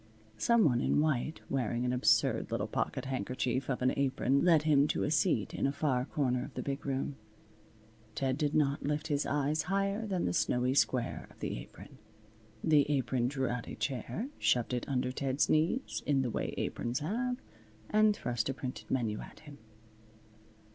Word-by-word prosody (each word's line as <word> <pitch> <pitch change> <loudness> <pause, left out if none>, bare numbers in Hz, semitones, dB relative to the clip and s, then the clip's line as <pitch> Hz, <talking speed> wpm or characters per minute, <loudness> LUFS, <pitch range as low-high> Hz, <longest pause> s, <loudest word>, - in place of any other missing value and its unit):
Some 235 - +4
one 125 -4 +3
in - - +2
white 155 0 0
wearing 120 -2 -1
an 125 - +1
absurd 110 -3 +3
little - - -1
pocket - - -2
handkerchief 130 0 -2
of 125 -1 -1
an 130 - +3
apron 135 0 +1
led 165 -4 +5
him 145 -2 +4
to - - 0
a 150 - 0
seat 155 - +1
in - - 0
a - - +1
far 135 -3 0
corner 125 -4 0
of 140 0 -10
the - - -3
big 140 0 -4
room. 135 +1 -2 1.0
Ted 130 +3 0
did 150 0 -1
not 140 -2 +2
lift 150 +2 -2
his 145 -1 0
eyes 150 +2 +1
higher 200 +3 0
than 185 -3 -1
the 90 - 0
snowy 125 +7 +1
square 125 -3 +1
of - - -20
the - - -3
apron. - - -12 0.6
The 150 -3 +4
Apron 130 -3 +1
drew 135 -1 -1
out 120 -1 -3
a - - -6
chair, 135 - -3
shoved 120 0 +2
it 125 +2 -3
under 125 -1 0
Ted's 135 +1 0
knees 165 - +1
in 140 -2 +3
the 125 - -2
way - - -3
Aprons 120 +1 -2
have, 245 - -1 0.5
and 215 0 +4
thrust 120 - -2
a 135 - -2
printed 130 0 -6
menu 115 -5 0
at - - -11
him. 145 -2 -12
135 Hz, 180 wpm, -32 LUFS, 125-150 Hz, 1.0 s, led